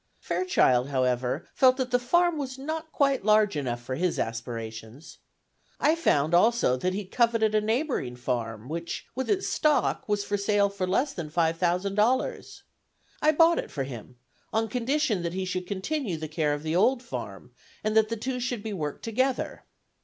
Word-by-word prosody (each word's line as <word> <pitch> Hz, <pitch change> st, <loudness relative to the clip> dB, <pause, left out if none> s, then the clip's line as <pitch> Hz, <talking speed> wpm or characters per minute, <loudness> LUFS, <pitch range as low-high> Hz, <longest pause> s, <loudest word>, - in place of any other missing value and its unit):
Fairchild, 135 Hz, -, +2 dB
however, 130 Hz, +1 st, 0 dB
felt 260 Hz, -1 st, +5 dB
that 255 Hz, -2 st, -2 dB
the 245 Hz, -, +3 dB
farm 345 Hz, +7 st, +2 dB
was 270 Hz, -3 st, -4 dB
not 315 Hz, +3 st, -5 dB
quite 275 Hz, -5 st, +1 dB
large 210 Hz, -2 st, +4 dB
enough 125 Hz, -5 st, -2 dB
for 130 Hz, -, -4 dB
his 175 Hz, +6 st, 0 dB
aspirations. 115 Hz, +4 st, -6 dB, 0.6 s
I 300 Hz, -, +4 dB
found 160 Hz, -, +1 dB
also 220 Hz, -, +4 dB
that 185 Hz, +9 st, -1 dB
he 205 Hz, 0 st, -3 dB
coveted 225 Hz, +1 st, +2 dB
a 215 Hz, -, +3 dB
neighboring 220 Hz, -, -1 dB
farm, 115 Hz, -2 st, -3 dB
which, 170 Hz, +3 st, -5 dB
with 260 Hz, +1 st, -3 dB
its 395 Hz, -2 st, +1 dB
stock, 300 Hz, -7 st, +1 dB
was 205 Hz, -1 st, +1 dB
for 205 Hz, 0 st, -1 dB
sale 200 Hz, 0 st, +2 dB
for 195 Hz, -2 st, -3 dB
less 265 Hz, +10 st, +1 dB
than 165 Hz, -4 st, -5 dB
five 165 Hz, +1 st, +1 dB
thousand 180 Hz, +2 st, +1 dB
dollars. 230 Hz, +6 st, 0 dB, 0.6 s
I 305 Hz, -, +5 dB
bought 330 Hz, +2 st, +4 dB
it -, -, -4 dB
for 135 Hz, -, -3 dB
him, 125 Hz, -2 st, -9 dB, 0.4 s
on 220 Hz, 0 st, 0 dB
condition 250 Hz, -, 0 dB
that 170 Hz, 0 st, -3 dB
he 190 Hz, 0 st, -2 dB
should 180 Hz, 0 st, -3 dB
continue 205 Hz, -, -2 dB
the 155 Hz, 0 st, -5 dB
care 155 Hz, -1 st, 0 dB
of 145 Hz, -, -8 dB
the 160 Hz, +1 st, -1 dB
old 245 Hz, +7 st, +3 dB
farm, 235 Hz, -, -7 dB, 0.3 s
and 215 Hz, 0 st, 0 dB
that 220 Hz, -1 st, +4 dB
the 230 Hz, -, -2 dB
two 250 Hz, +3 st, -3 dB
should 245 Hz, -3 st, -3 dB
be 220 Hz, -2 st, -4 dB
worked 150 Hz, -6 st, -4 dB
together. 255 Hz, +3 st, -1 dB
205 Hz, 185 wpm, -27 LUFS, 150-255 Hz, 0.6 s, felt